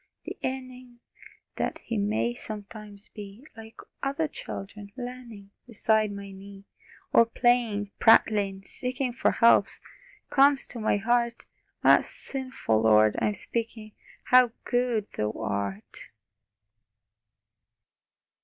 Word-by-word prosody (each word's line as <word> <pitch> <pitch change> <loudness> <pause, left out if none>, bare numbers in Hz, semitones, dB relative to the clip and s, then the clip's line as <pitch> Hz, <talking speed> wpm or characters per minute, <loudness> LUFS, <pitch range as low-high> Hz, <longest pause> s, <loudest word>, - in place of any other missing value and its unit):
the - - -6
yearning 255 -2 -6 0.6
That - - -2
He 230 - -4
may 215 +3 0
sometimes 210 -2 -10
be 210 +5 -11
Like 225 0 -12 0.2
other 280 +3 -1
children, 200 -6 -8
learning 245 -5 -9 0.2
Beside 220 -2 +1
my 200 -1 -8
knee, 195 +1 -12 0.5
Or - - +7
playing, 230 -4 +1
prattling, 200 -3 +4
seeking 250 0 -3
For 255 - +1
help 230 0 +5 0.6
comes 275 0 +4
to 240 - -8
my 215 -1 +1
heart.... 235 +2 0 0.4
Ah - - +7
sinful, 255 - -3
Lord, 110 -1 +5
I'm 210 - +1
speaking 225 -1 -5 0.3
How 250 -1 +5
good 245 -4 0
Thou 105 0 -2
art! 100 -2 -5
220 Hz, 105 wpm, -27 LUFS, 200-245 Hz, 0.6 s, Or